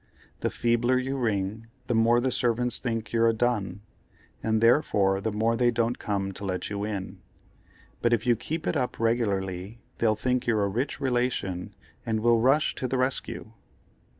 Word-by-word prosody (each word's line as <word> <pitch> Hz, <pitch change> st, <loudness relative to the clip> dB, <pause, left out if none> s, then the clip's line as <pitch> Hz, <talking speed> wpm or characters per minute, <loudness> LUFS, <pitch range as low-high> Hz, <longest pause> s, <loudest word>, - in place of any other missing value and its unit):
The -, -, 0 dB
feebler 120 Hz, +2 st, +1 dB
you 135 Hz, +2 st, -1 dB
ring, 110 Hz, -3 st, -1 dB, 0.2 s
the 120 Hz, -, -1 dB
more 115 Hz, +1 st, +4 dB
the 130 Hz, +1 st, 0 dB
servants 125 Hz, 0 st, 0 dB
think 115 Hz, -3 st, -3 dB
you're 115 Hz, 0 st, +4 dB
a -, -, +2 dB
dun, 105 Hz, -5 st, -1 dB, 0.6 s
and 110 Hz, 0 st, +1 dB
therefore 105 Hz, -5 st, +3 dB
the 110 Hz, -, -1 dB
more 110 Hz, +2 st, +1 dB
they 120 Hz, +1 st, +3 dB
don't 120 Hz, 0 st, 0 dB
come 100 Hz, -2 st, -2 dB
to 100 Hz, -, -9 dB
let 95 Hz, 0 st, -3 dB
you 100 Hz, 0 st, -2 dB
in—but 105 Hz, +3 st, -6 dB
if 120 Hz, 0 st, +1 dB
you 120 Hz, -1 st, +4 dB
keep 155 Hz, +8 st, -4 dB
it -, -, 0 dB
up 125 Hz, -, -1 dB
regularly 100 Hz, -3 st, -1 dB, 0.2 s
they'll 110 Hz, -2 st, +3 dB
think 125 Hz, +3 st, -1 dB
you're 110 Hz, -3 st, +2 dB
a -, -, -1 dB
rich 125 Hz, +10 st, -2 dB
relation 120 Hz, -9 st, -1 dB, 0.3 s
and 110 Hz, -1 st, -1 dB
will 115 Hz, 0 st, +4 dB
rush 135 Hz, +5 st, +3 dB
to 130 Hz, -, -2 dB
the 130 Hz, -, -1 dB
rescue." 130 Hz, -3 st, -2 dB
115 Hz, 175 wpm, -27 LUFS, 105-125 Hz, 0.6 s, more